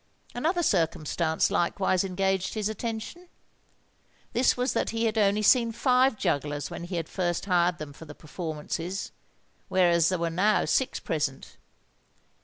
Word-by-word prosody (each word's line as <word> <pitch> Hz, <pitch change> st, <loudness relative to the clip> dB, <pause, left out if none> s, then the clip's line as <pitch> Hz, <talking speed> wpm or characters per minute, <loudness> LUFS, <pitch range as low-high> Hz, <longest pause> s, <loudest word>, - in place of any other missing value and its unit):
Another 335 Hz, +8 st, 0 dB
circumstance 160 Hz, -, +1 dB
likewise 185 Hz, +1 st, +1 dB
engaged 190 Hz, +1 st, -1 dB
his 215 Hz, -2 st, -1 dB
attention. 225 Hz, -, -5 dB, 1.0 s
This 250 Hz, +2 st, +3 dB
was 250 Hz, +2 st, 0 dB
that -, -, 0 dB
he 230 Hz, 0 st, -1 dB
had 220 Hz, -1 st, 0 dB
only 210 Hz, -1 st, +2 dB
seen 230 Hz, +1 st, +4 dB
five 255 Hz, +1 st, +2 dB
jugglers 145 Hz, -3 st, -2 dB
when 170 Hz, -, -6 dB
he 175 Hz, +1 st, -5 dB
had 165 Hz, -2 st, -2 dB
first 175 Hz, -2 st, -2 dB
hired 175 Hz, -2 st, +2 dB
them 150 Hz, -2 st, -8 dB
for 160 Hz, -, -12 dB
the 150 Hz, -1 st, -11 dB
performances; 165 Hz, +3 st, -5 dB, 0.6 s
whereas 170 Hz, -3 st, +4 dB
there 185 Hz, -, 0 dB
were 170 Hz, 0 st, -1 dB
now 200 Hz, +6 st, +2 dB
six 265 Hz, -, 0 dB
present. 150 Hz, -, -3 dB
185 Hz, 145 wpm, -27 LUFS, 165-220 Hz, 1.0 s, seen